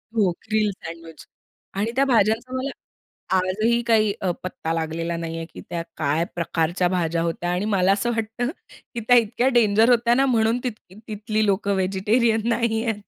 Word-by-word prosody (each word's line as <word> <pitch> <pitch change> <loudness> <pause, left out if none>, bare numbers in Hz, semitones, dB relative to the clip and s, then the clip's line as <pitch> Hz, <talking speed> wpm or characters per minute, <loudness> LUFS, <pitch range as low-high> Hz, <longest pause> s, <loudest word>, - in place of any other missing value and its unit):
हो, 205 -4 +3
grill 215 -1 +1
sandwich 165 -3 -10 0.5
आणि 220 +3 0
त्या 275 - +3
भाज्यांचा 230 +1 +2
मला 270 +2 -2 0.7
आजही 215 +6 +1
काही 215 -3 +3
अ, 185 - 0
पत्ता 165 -3 -4
लागलेला 165 +1 -2
नाही 165 0 -4
आहे 165 - -5
की - - -9
त्या 170 -1 -3 0.2
काय 155 +1 +1
प्रकारच्या 170 +1 0
भाज्या 170 -2 0
होत्या? 170 +1 -2
आणि 180 +3 -1
मला 195 -2 +2
असं 235 +4 -1
वाटतं 225 +3 -2 0.5
की - - -1
त्या 245 - +7
इतक्या 235 +3 +1
डेंजर 220 +1 +4
होत्या 235 0 +4
ना 270 +1 +3
म्हणून 230 -1 +2
तिथ 250 - -1 0.4
तिथली 215 0 -1
लोकं 200 0 +1
व्हेजिटेरियन 215 +4 +1
नाही 230 -1 0
आहेत. 225 -3 0
210 Hz, 170 wpm, -23 LUFS, 175-230 Hz, 0.7 s, त्या